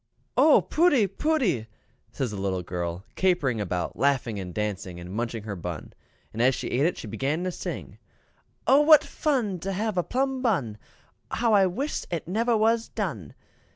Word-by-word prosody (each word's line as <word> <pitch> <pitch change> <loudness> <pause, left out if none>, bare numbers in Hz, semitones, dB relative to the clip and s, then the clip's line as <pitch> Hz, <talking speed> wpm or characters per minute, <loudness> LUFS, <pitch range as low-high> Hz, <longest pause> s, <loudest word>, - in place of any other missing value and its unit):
"Oh, 310 - +6
pooty, 305 -8 +3
pooty!" 195 - 0 0.4
says 130 -5 -3
the 105 - -5
little 95 -2 -1
girl, 85 +2 -4
capering 145 - +1
about, 90 -3 -3
laughing 130 -6 +1
and 90 -2 -6
dancing, 95 -3 -4
and 90 +2 -8
munching 115 0 -3
her 105 -2 -5
bun; 85 -3 -6 0.4
and 115 - -2
as 130 +1 +4
she - - -4
ate 135 +6 +2
it 180 - -2
she - - -7
began 135 - -2
to 185 - -1
sing: - - -6 0.7
"O 275 +2 +6
what 305 0 +7
fun 240 - -1
to 195 +4 -3
have 205 0 -1
a - - +1
plum 265 +3 -1
bun! 140 - 0 0.5
how 230 -2 +1
I 195 -2 +5
wis 265 +12 -3
it 170 -3 -4
never 225 +5 +1
was 225 +1 +2
done!" 110 - -4
155 Hz, 175 wpm, -26 LUFS, -, 0.7 s, what